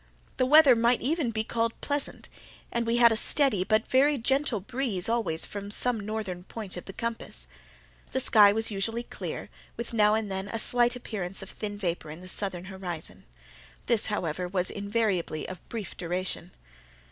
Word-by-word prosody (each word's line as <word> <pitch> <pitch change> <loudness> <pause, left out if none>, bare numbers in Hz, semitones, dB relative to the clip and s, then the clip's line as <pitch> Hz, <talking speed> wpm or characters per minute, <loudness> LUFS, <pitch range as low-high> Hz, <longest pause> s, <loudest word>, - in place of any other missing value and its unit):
The 255 - +2
weather 295 -2 +8
might 235 +1 +2
even 295 -1 0
be 220 -1 -1
called 230 0 -1
pleasant, 285 0 -2 0.4
and 235 -1 -1
we 230 +1 +2
had 235 -1 +7
a - - +2
steady 235 -4 +3
but 215 +3 +2
very 280 +3 +4
gentle 265 -1 +1
breeze 225 -3 0
always 225 -9 +1
from 200 0 -6
some 240 +2 +2
northern 205 -4 -4
point 205 0 -4
of 180 - -7
the - - -7
compass. 230 +2 -4 0.7
The 260 - 0
sky 210 -5 +7
was 225 +2 -1
usually 225 +4 -1
clear, - - -6 0.3
with 235 0 -5
now 210 -1 +4
and 220 -2 -2
then 190 +1 -3
a 225 - -3
slight 240 +2 +3
appearance 195 -6 -4
of 195 - -8
thin 205 -1 -5
vapour 175 -5 -3
in 155 +3 -8
the 185 - -10
southern 185 -2 -2
horizon—this, 160 - -5
however, 180 -4 -2
was 180 0 0
invariably 200 -6 -1
of 185 -2 -10
brief 220 -4 -5
duration. 180 +1 -3
215 Hz, 170 wpm, -28 LUFS, 185-235 Hz, 0.7 s, weather